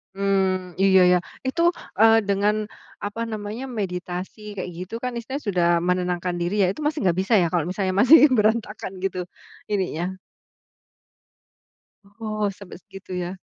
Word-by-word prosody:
Mmm. 190 -2 0
Iya 190 -1 +6
ya 180 - +5 0.3
itu, 270 +6 -1 0.4
eee, 225 0 +7
dengan, 200 +1 +2 0.5
apa 205 +3 -4
namanya, 215 +3 -5 0.2
meditasi 180 0 -4 0.2
kayak 185 -2 -4
gitu 180 +4 -8
kan 250 - -1
istilahnya 260 +4 -5
sudah 180 -3 +2 0.2
menenangkan 180 -1 0
diri 175 +2 -1
ya, 190 - +4
itu 310 - -8
masih 300 +1 0
nggak 180 -2 +2
bisa 195 +5 -1
ya 170 - +2
kalau 170 -4 +1
misalnya 185 0 -1
masih 285 +7 +8 0.2
berantakan 215 -2 0
gitu 190 -1 -1 0.5
ininya? 185 -3 -1 2.1
Oh 215 -2 -1
sampai 200 -1 -11
segitu 195 -2 -11
ya. 180 +1 -4
195 Hz, 140 wpm, -23 LUFS, 180-215 Hz, 2.1 s, masih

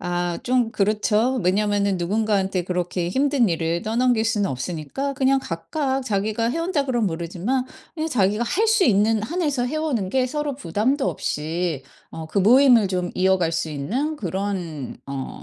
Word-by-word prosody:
아 175 -1 -2
좀 245 -2 +1
그렇죠. 215 +4 +1
왜냐하면은 200 +1 +1
누군가한테 195 0 0
그렇게 180 -1 -2
힘든 265 0 +2
일을 165 0 -1
떠넘길 230 +1 +1
수는 210 -4 +1
없으니까 160 - -4
그냥 270 0 +2
각각 265 - -2
"자기가 215 +1 0
해 325 - -2
온다." 330 -5 0
그러면 240 -6 +1
모르지만 175 +10 -2 0.3
그냥 320 0 -2
자기가 210 -3 +1
할 430 - +1
수 440 -3 +4
있는 215 0 +3
한에서 295 -3 -1
해 285 - -4
오는 270 -12 -1
게 255 +4 +1
서로 295 -1 -2
부담도 260 - 0
없이 160 -1 -3 0.3
어 160 -1 -6
그 180 - -1
모임을 235 +1 +6
좀 180 -1 -2
이어갈 185 -2 +2
수 165 -1 -2
있는 245 - -2
그런 185 - -4
어 135 -1 -6
210 Hz, 335 characters per minute, -23 LUFS, 180-260 Hz, 0.3 s, 모임을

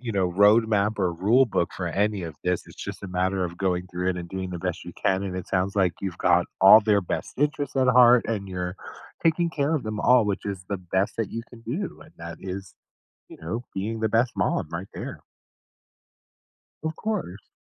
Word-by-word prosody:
you 120 -3 -4
know, 95 -2 +2
road 105 +5 +4
map 105 0 +1
or 90 - +1
rule 105 +10 +4
book 100 -7 -1
for 90 -2 -2
any 100 +2 0
of 80 -4 -7
this, 90 0 0
it's - - -15
just - - -7
a 100 - -6
matter 95 +1 0
of 85 0 -6
going 90 -2 0
through 90 +1 -1
it 90 - -3
and 85 -1 -6
doing 95 0 -5
the 90 - -5
best 90 -1 -3
you 90 - -8
can, 95 +1 +2
and 95 -2 -4
it 95 - -6
sounds 95 +1 0
like 95 -4 +2
you've 95 -4 -4
got 90 0 +3
all 95 +3 +9
their 105 -1 +3
best 90 - -4
interests 145 0 -1
at 130 -2 +2
heart 125 -1 +6
and 105 -4 -2
you're 90 0 -4 0.5
taking 170 +1 +2
care 150 0 0
of 150 - -1
them 110 -1 -4
all, 125 +1 +5
which 105 0 -2
is 95 -2 -4
the 100 - -1
best 95 +2 -1
that 115 - -2
you 115 - -4
can 120 - -13
do, 160 - -4
and - - -15
that 85 0 -8
is, 95 0 -7 0.5
you - - -13
know, 110 +10 -4
being 110 +4 -3
the 110 -1 0
best 115 +2 +2
mom - - 0
right 90 +4 -5
there. - - -6 1.6
Of 160 0 -2
course. 185 - -4
100 Hz, 220 wpm, -25 LUFS, 90-115 Hz, 1.6 s, all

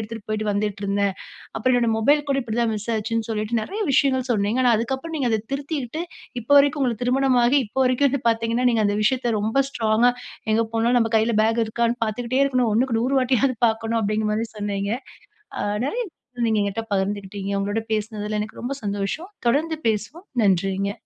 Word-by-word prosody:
எடுத்துட்டு 220 0 -7
போயிட்டு 215 0 -2
வந்துட்டு 205 0 -2
இருந்தேன். 200 0 0 0.4
அப்புறம் 255 +3 +1
என்னுடைய 235 -2 +2
மொபைல் 290 +6 +3
கூட 275 - +2
இப்டி 225 -1 -4
தான் 230 -1 +1
மிஸ் 210 +2 -6
ஆச்சுன்னு 225 +1 -2
சொல்லிட்டு 220 +1 -1
நிறைய 410 - -5
விஷயங்கள் 260 -1 +2
சொன்னீங்க. 215 +2 +1
ஆனா, 240 - +5
அதுக்கு 235 +4 -1
அப்புறம் 325 +4 -7
நீங்க 260 -4 0
அத 220 -1 +1
திருத்தீட்டு, 285 0 -3 0.4
இப்ப 230 - -20
வரைக்கும் 285 0 +4
உங்களுக்கு 240 -2 -1
திருமணமாகி 255 0 +3
இப்ப 220 - -15
வரைக்கும் 255 +3 +3
வந்து 275 0 -2
பார்த்தீங்கனா, 230 +2 0
நீங்க 225 -2 +2
அந்த 205 - 0
விஷயத்த 240 0 +1
ரொம்ப 220 +5 -1
ஸ்ட்ராங்கா 235 -5 -3 0.6
எங்க 220 +1 +3
போனாலும் 230 +2 +2
நம்ம 225 -1 0
கையில 220 +2 +2
பேக் 225 +1 +2
இருக்காணு 235 +1 0
பார்த்துக்கிட்டே 240 +4 -1
இருக்கணும். 255 -4 +1
1க்கு 235 +1 +1
100 255 +3 0
வாட்டியாவது 255 0 +2
பார்க்கணும் 225 +1 -1
அப்டிங்கிற 215 +1 0
மாரி 225 +2 -1
சொன்னீங்க. 200 -1 -2 0.7
அ - - -1 0.2
நிறைய 475 - -1 0.4
நீங்க 220 -1 +2
எங்கிட்ட 200 +3 -2
பகிர்ந்துகிட்டீங்க. 200 0 -2
உங்களோட 205 +3 -1
பேசுனதில 215 -1 -2
எனக்கு 215 +1 -6
ரொம்ப 255 +3 -2
சந்தோஷம். 205 - -3 0.2
தொடர்ந்து 315 +6 +1
பேசுவோம். 220 - -3 0.2
நன்றிங்க. 195 0 +1
225 Hz, 180 wpm, -23 LUFS, 210-255 Hz, 0.7 s, ஆனா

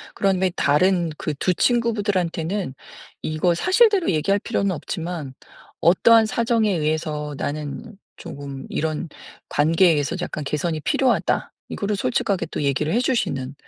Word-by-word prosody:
그런 195 -2 +1
후에 190 -1 +2
다른 170 +4 +2
그 155 - -3
2 180 +6 +1
친구분들한테는 200 - 0 0.5
이거 155 +3 +1
사실대로 385 - +3
얘기할 180 +5 +1
필요는 200 0 -1
없지만 165 -3 -5 0.5
어떠한 225 +6 +5
사정에 225 -1 +1
의해서 150 -2 -2
"나는 150 +9 -5 0.2
쪼금 140 -5 -8
이런 160 +2 -2 0.4
관계에 165 +4 +4
의해서 150 +1 0
약간 150 - -4
개선이 155 +3 -2
필요하다." 255 - +1 0.2
이거를 205 +1 -2
솔직하게 200 -2 -1
또 150 - -4
얘기를 140 +2 0
해 235 - +3
주시는 140 - -1
170 Hz, 325 characters per minute, -22 LUFS, 150-205 Hz, 0.5 s, 어떠한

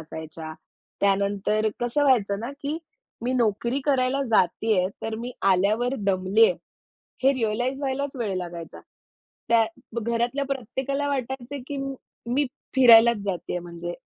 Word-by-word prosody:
असायच्या. 160 0 -8 0.5
त्यानंतर 200 +2 +1
कसं 240 +4 +1
व्हायचं 205 -7 +3
ना, 235 - -4
की 295 +3 -3 0.4
मी 245 +2 0
नोकरी 240 +2 +1
करायला 270 -1 +2
जातीये, 185 -1 +2
तर 225 0 -3
मी 245 +2 -5 0.2
आल्यावर 215 +7 +1
दमलीये 200 +2 +3 0.7
हे 270 +1 +5
रिअलाईज 245 +3 -1
व्हायलाच 275 0 -2
वेळ 215 -6 -2
लागायचा. 170 -2 -6 0.7
त्या 230 -1 +5 0.4
घरातल्या 235 +5 0
प्रत्येकाला 270 +2 -2
वाटायचं 265 0 -4
की 285 - -5 0.6
मी 285 +1 +2 0.3
फिरायलाच 235 -3 +8
जातीये, 180 -2 -3
म्हणजे. 175 0 -6
235 Hz, 120 wpm, -25 LUFS, 200-265 Hz, 0.7 s, फिरायलाच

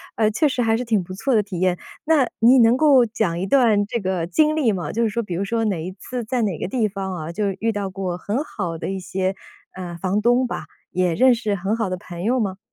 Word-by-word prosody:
呃， 215 -1 +3
确 300 +8 +2
实 260 -2 -1
还 225 -1 +2
是 250 - -3
挺 215 -5 +1
不 185 - -9
错 255 +7 -1
的 210 - +4
体 190 -4 -6
验。 180 -1 +2 0.3
那 305 -5 +4
你 245 +3 +6
能 235 +2 +5
够 275 -5 +5
讲 215 -6 -1
一 190 - -1
段 225 -6 +4
这 235 +3 -3
个 185 -3 -1
经 305 - +2
历 260 -8 +2
吗？ 180 -3 -3
就 230 - -1
是 220 - +2
说 235 +3 -2
比 180 - -6
如 185 +4 -1
说 225 +2 -1
哪 180 -6 -1
一 185 - -5
次 245 +4 -6
在 240 +1 -1
哪 195 -6 -1
个 - - -2
地 220 0 0
方 190 -1 -5
啊， 160 0 -5
就 205 +3 -1
是 190 - -5
遇 225 +2 +1
到 200 -2 -3
过 185 -2 -4
很 215 +9 -2
好 175 - -4
的 - - -4
一 190 - -3
些， 190 +1 -2 0.4
呃， 175 -2 -6
房 190 +4 0
东 245 +3 +3
吧， - - -5 0.3
也 180 -2 +1
认 255 0 +5
识 220 -3 -1
很 195 +4 -1
好 220 -5 -1
的 185 - -3
朋 175 0 -8
友 250 +4 +1
吗？ 195 -3 -2
205 Hz, 290 characters per minute, -22 LUFS, 185-235 Hz, 0.4 s, 你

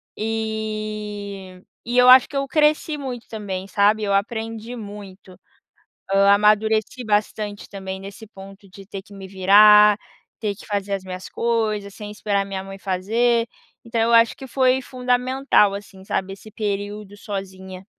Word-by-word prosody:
E 215 -3 -5 0.2
e 240 +1 -2
eu 250 0 +6
acho 255 0 +8
que 280 - -4
eu 275 - -1
cresci 300 +2 +1
muito 255 -4 -6
também, 195 -4 -5
sabe, 205 +2 +2
eu 200 -1 0
aprendi 225 +3 -3
muito. 200 -3 -11 0.7
Hã, 200 0 +5
amadureci 215 +3 +2
bastante 210 -1 -2
também 190 -1 -6
nesse 200 +3 -10
ponto, 195 -1 -14
de 195 +1 -13
ter 195 -2 -8
que 205 - -17
me 195 -1 -9
virar, 210 +2 +6 0.4
ter 210 -3 -2
que - - -14
fazer 200 -2 -3
as 195 - -3
minhas 185 0 -8
coisas, 215 -4 -1
sem 210 -1 -8
esperar 205 -1 -1
minha 190 -1 -5
mãe 195 0 -10
fazer. 230 +6 0 0.4
Então 230 0 -1
eu 230 +1 +2
acho 230 0 +5
que 265 - -10
foi 260 0 +2
fundamental, 250 -4 +1
assim, 200 -1 -11
sabe, 195 0 -3
esse 205 +2 -13
período 205 -1 -4
sozinha. 190 -2 -7
210 Hz, 155 wpm, -22 LUFS, 195-225 Hz, 0.7 s, acho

